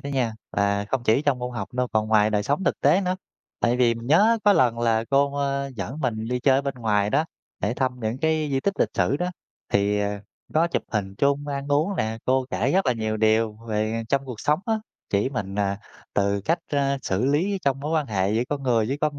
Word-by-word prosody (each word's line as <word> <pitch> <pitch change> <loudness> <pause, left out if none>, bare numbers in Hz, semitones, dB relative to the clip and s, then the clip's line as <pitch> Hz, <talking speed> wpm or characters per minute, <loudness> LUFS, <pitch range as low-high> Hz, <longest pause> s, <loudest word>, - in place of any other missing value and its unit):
đó 140 - -6
nha, 130 -5 0 0.2
và 100 0 +1
không 135 -3 -1
chỉ 115 +6 +3
trong 140 -4 +1
môn 125 0 -4
học 120 - -5
đâu, 125 -1 0
còn 110 0 +1
ngoài 110 -1 +4
đời 105 -1 +1
sống 145 - -1
thực - - 0
tế 190 - +4
nữa. 185 -1 -1 0.4
Tại 120 +1 +2
vì 120 -2 +3
mình 115 +1 -8
nhớ 215 - +5
có 205 - +7
lần 120 -9 +3
là 115 -1 +2
cô, 140 +1 +3
ơ, 140 -1 -1
dẫn 115 +10 -5
mình 115 -4 -2
đi 125 0 -1
chơi 135 +1 +4
ở 140 - +1
bên 140 -1 -3
ngoài 105 -4 +1
đó 150 +3 +2 0.4
để 105 +4 0
thăm 130 -1 -1
những 110 +2 -2
cái 155 0 +1
di 135 - +1
tích 200 +4 0
lịch - - +3
sử 95 +10 +2
đó, 180 +3 -2 0.4
thì, 100 +1 +2
ờ, 100 0 -1 0.4
có 165 +2 +4
chụp - - -1
hình 100 -2 -2
chung, 140 +1 +1
ăn 140 0 -4
uống 155 +8 +1
nè, 110 +1 -1
cô 130 0 +1
kể - - 0
rất 190 +2 +2
là 125 - +4
nhiều 110 -1 -2
điều 110 0 +2
về 110 +1 -1
trong 140 0 +1
cuộc 125 -5 -7
sống 150 +2 +2
á, 225 - +2 0.4
chỉ 100 +4 +1
mình, 100 -7 -4
à, 100 -1 0 0.4
từ 100 0 +1
cách, 165 - +2
a, 140 -1 0
xử 95 +5 0
lý 170 +9 +1
trong 135 -1 0
mối 150 +2 -3
quan 155 -3 +1
hệ 95 -2 0
giữa 115 +2 +2
con 145 -1 -3
người 115 -4 +2
với 140 +2 -2
con 150 -2 0
125 Hz, 245 wpm, -24 LUFS, 110-145 Hz, 0.4 s, có